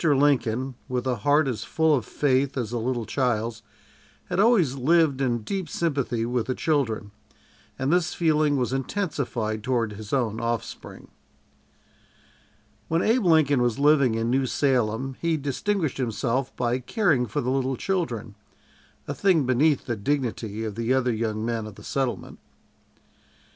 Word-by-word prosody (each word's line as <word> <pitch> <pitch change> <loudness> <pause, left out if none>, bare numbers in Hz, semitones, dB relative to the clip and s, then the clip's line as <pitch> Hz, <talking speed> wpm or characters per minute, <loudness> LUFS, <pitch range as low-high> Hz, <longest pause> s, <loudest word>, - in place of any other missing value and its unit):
Lincoln, 135 -4 +2 0.2
with 125 -1 -2
a 125 -2 0
heart 145 +7 +3
as 125 -5 -3
full 160 -1 +2
of 125 -6 +1
faith 135 -1 +1
as 120 -4 -2
a 120 - -2
little 120 0 -2
child's, 115 -2 -1 0.7
had - - -1
always 200 - +4
lived 140 +1 +2
in 120 -4 0
deep 190 - -3
sympathy 135 -8 -1
with 120 -1 -1
the 130 - -1
children, 120 -9 -1 0.7
and 135 +4 0
this 175 -1 +1
feeling 155 -3 +2
was 125 0 -1
intensified 135 - -2
toward 120 -4 0
his 105 0 -9
own 115 -5 0
offspring. 115 -1 -5 1.8
When 165 +1 +1
Abe 225 0 +2
Lincoln 155 -6 +4
was 120 -2 +1
living 140 -5 +4
in 115 +1 -1
New 130 0 +1
Salem 130 0 0
he 165 -1 +1
distinguished 155 +3 -1
himself 125 +2 -1
by 120 +1 0
caring 135 - +1
for 105 - -2
the 125 - -1
little 135 -1 0
children 125 - -2 0.7
a - - -2
thing 175 -8 +2
beneath 135 +3 +2
the 120 - -2
dignity 115 -3 -2
of 110 -2 -3
the 115 +4 0
other 125 -2 +1
young 110 -1 -2
men 115 -2 -2
of 105 - -10
the - - -13
settlement. 135 -3 -3
130 Hz, 155 wpm, -25 LUFS, 115-145 Hz, 1.8 s, always